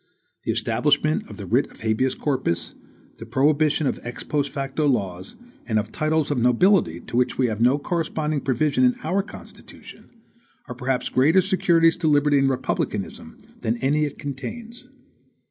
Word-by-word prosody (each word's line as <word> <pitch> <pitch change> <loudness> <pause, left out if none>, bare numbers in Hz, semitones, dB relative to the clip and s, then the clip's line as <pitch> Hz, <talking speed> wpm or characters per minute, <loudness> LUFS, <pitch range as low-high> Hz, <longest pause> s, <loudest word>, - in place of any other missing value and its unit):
The - - +1
establishment 75 +1 +1
of - - -10
the - - -7
writ - - +1
of - - -17
habeas 110 +4 0
corpus, 130 - -2 0.5
the 115 - -8
prohibition 150 +4 +2
of 130 - -1
ex 120 0 -7
post 145 -2 -1
facto 140 +2 -2
laws, 95 -8 -2 0.3
and 110 -3 +1
of 105 - -2
TITLES 155 -1 0
OF 140 - 0
NOBILITY, 125 - +3
to - - -8
which 125 0 +1
we 130 - +2
have 110 -2 -2
no 125 +4 +4
corresponding 155 -1 -2
provision 135 +1 +1
in 125 0 +4
our 180 +6 +1
Constitution, 205 - -13 0.6
are - - -6
perhaps 125 +1 -2
greater 155 +8 +4
securities 175 -3 +3
to 170 -2 -1
liberty 145 -1 +4
and 135 0 +3
republicanism 130 - -3 0.2
than 115 +2 -1
any 145 +4 +1
it 145 - -6
contains. 220 - -7
140 Hz, 165 wpm, -23 LUFS, 125-155 Hz, 0.6 s, no